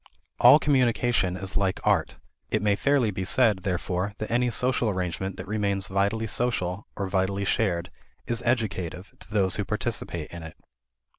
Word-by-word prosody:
All - - +9
communication 120 - +1
is 95 0 -4
like 95 -2 +1
art. - - +1 0.3
It - - 0
may 105 -1 +3
fairly 135 -2 +2
be 95 -1 -4
said, 110 0 +3
therefore, 95 +1 -2
that 110 - -5
any 120 +1 +2
social 125 -1 +1
arrangement 95 0 -3
that - - -7
remains 100 -2 -1
vitally 100 +4 0
social, 105 -4 -1
or 100 - -3
vitally 95 +1 0
shared, 90 -5 0 0.3
is 120 0 -2
educative 100 -7 -2
to - - -12
those 100 -3 +1
who 100 - 0
participate 105 -6 -3
in 85 - -8
it. 80 -1 -10
100 Hz, 160 wpm, -26 LUFS, 95-115 Hz, 0.3 s, All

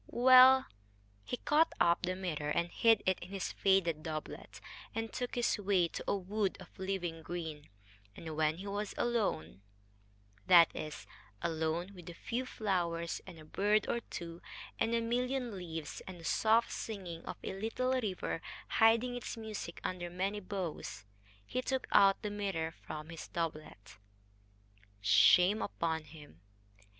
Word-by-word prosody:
Well, 255 +2 +7 0.6
he 245 - -4
caught 310 +5 +3
up 170 +1 +4
the 185 0 -1
mirror 160 -6 -3
and 170 +3 0
hid 225 -2 +4
it 185 -1 +2
in 175 - -9
his 195 -2 -3
faded 180 -5 +2
doublet, 155 -1 -6 0.4
and 225 0 -3
took 245 -1 -3
his 240 -2 +1
way 190 -4 +2
to - - -6
a - - +2
wood 200 +1 -1
of 185 -1 -14
living 180 -4 -3
green, 160 -3 -6 0.5
and 160 -2 -7
when 155 0 +1
he 190 - -8
was 205 +1 -3
alone 200 - -1 0.9
that 170 -3 +7
is, 155 -1 -6 0.4
alone 165 +3 -1
with 180 -3 -11
a 170 - -9
few 245 +8 -3
flowers 170 -7 -1
and 180 -3 -10
a 155 - -12
bird 205 +6 +1
or 235 - 0
two, 170 -6 -8 0.4
and 230 +1 +1
a 230 - +1
million 245 0 -1
leaves, 160 -5 -6
and 185 -2 -8
the 165 - -11
soft 225 +5 +3
singing 185 -6 -6
of - - -6
a - - -4
little 225 +6 -1
river 205 -9 -2 0.4
hiding 230 +2 +5
its 245 -1 -5
music 215 -6 -6
under 175 -1 -3
many 190 +4 -2
boughs 170 - -5 0.4
he 255 - -2
took 265 0 -1
out 195 +3 +5
the 210 - -2
mirror 195 -6 -2
from 155 -1 -8
his 165 -1 -8
doublet. 155 - -5 1.0
Shame 180 - +5
upon 160 -4 -2
him! 145 - -14
185 Hz, 155 wpm, -33 LUFS, 165-220 Hz, 1.0 s, Well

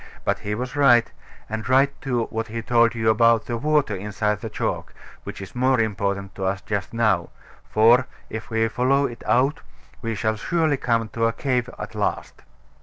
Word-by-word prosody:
But - - +1
he 105 +1 -3
was 125 +4 -5
right; 125 -5 +5 0.4
and 110 +2 -5
right, 135 +2 +4
too, 125 -4 0
what 110 0 -3
he 115 0 -5
told 120 0 +3
you 110 -1 +2
about 115 +1 +4
the 120 - -3
water 145 -3 +1
inside 105 +2 -2
the 115 - -5
chalk, - - -3 0.3
which - - -7
is 95 - -11
more 130 0 +2
important 100 -3 -1
to 95 - -6
us 95 +1 0
just 100 -2 -3
now; 105 -7 +1 0.4
for, 120 +4 +5 0.2
if 110 - -7
we 115 -1 +1
follow 130 +4 +2
it 120 -3 -6
out, 130 +7 +2 0.4
we 115 -2 -3
shall 110 +1 -1
surely 160 - +1
come 115 -3 0
to 115 0 0
a 115 - -1
cave 125 0 -1
at - - -7
last. - - -3
115 Hz, 185 wpm, -23 LUFS, 110-125 Hz, 0.4 s, right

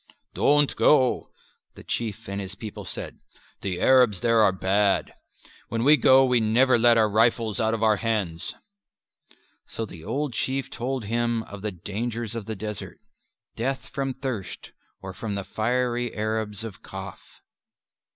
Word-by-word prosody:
"Don't 145 0 +3
go," 130 -4 +3 0.5
the - - -12
Chief 110 -1 -4
and 100 +1 -3
his 95 0 -6
people 105 +1 -8
said, - - -7 0.4
"the 90 -3 -3
Arabs 125 -8 +4
there 115 -1 +3
are 105 -2 +5
bad: 95 +2 +1 0.5
when 115 +1 -2
we 150 +4 +7
go 135 -1 +6
we 125 -2 +3
never 120 +3 +3
let 120 0 +5
our 110 -1 +4
rifles 110 0 +2
out 110 0 +1
of 115 - -3
our 110 -1 +4
hands." 100 -8 -2 1.1
So 115 - -4
the 85 -6 -11
old 140 - -2
Chief 135 +3 -2
told 125 -1 -3
him 115 +1 0
of 100 -2 -10
the 105 0 -3
dangers 110 +5 -4
of 115 -3 -6
the 110 - -3
desert; 105 0 -6 0.6
death 130 +1 -3
from 135 -2 -3
thirst 130 -8 -5 0.3
or 95 0 -6
from 105 0 -4
the 100 - -3
fiery 120 +2 -1
Arabs 110 -1 -2
of 110 -4 -8
Kaf. - - -8
115 Hz, 155 wpm, -25 LUFS, 105-120 Hz, 1.1 s, we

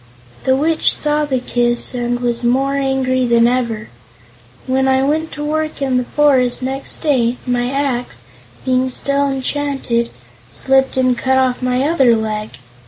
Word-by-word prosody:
The 260 - +3
Witch 315 +4 +2
saw 300 0 0
the 270 -3 -1
kiss 240 0 +2
and 245 0 -2
was 240 -1 -1
more 265 +3 +1
angry 265 -2 0
than 235 -1 +3
before. 235 -3 0 0.8
When 265 +1 +1
I 265 0 +2
went 310 +3 -1
to 295 - -5
work 310 +1 -2
in 265 -2 0
the 250 - -1
forest, 260 -3 +2
next 270 +5 -2
day, 250 -5 +1
my 245 -1 0
axe, 250 - -2 0.4
being 260 0 +1
still 280 +2 0
enchanted, 270 -3 -2 0.4
slipped 265 0 +1
and 255 -1 +2
cut 265 +2 0
off 260 -1 +1
my 250 +1 0
other 275 -6 +3
leg. 215 - -4
260 Hz, 155 wpm, -17 LUFS, 245-275 Hz, 0.8 s, The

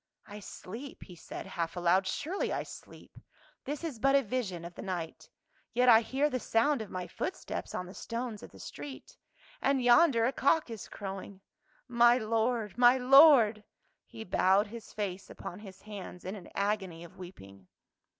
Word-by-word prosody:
"I 210 -1 -9
sleep," 225 +7 -9
he 180 - -13
said 165 - -8
half 170 0 -4
aloud, 180 +2 +2
"surely 345 - -2
I - - -1
sleep. - - -13 0.5
This 290 +3 -4
is 295 -9 -5
but 275 +3 +3
a 275 - +4
vision 200 -7 -3
of 175 - -8
the - - -9
night. 175 -4 -5 0.4
Yet 250 +1 +4
I 225 -1 +8
hear 270 +5 0
the 255 -4 -2
sound 235 +4 +1
of 215 - -7
my 180 -1 -4
footsteps 370 - -5
on 180 - -3
the 180 - -11
stones 230 -2 -5
of - - -10
the - - -16
street 280 -2 -9 0.2
— - - -26
and 275 0 +2
yonder 245 -1 +5
a 255 - +2
cock 280 0 +2
is 220 -3 -8
crowing. 195 -1 -7 0.5
My 240 0 +5
Lord, 225 -1 -1
my 245 +1 +7
Lord 255 -5 +7 0.2
!" - - -44
He 220 - -9
bowed 190 0 +3
his 230 +2 -10
face 195 -2 -5
upon 180 - -8
his 195 -3 -12
hands 200 -4 -9
in 185 - -4
an 195 - -11
agony 195 -5 -2
of 170 - -14
weeping. 100 - -12
220 Hz, 180 wpm, -31 LUFS, 190-255 Hz, 0.5 s, I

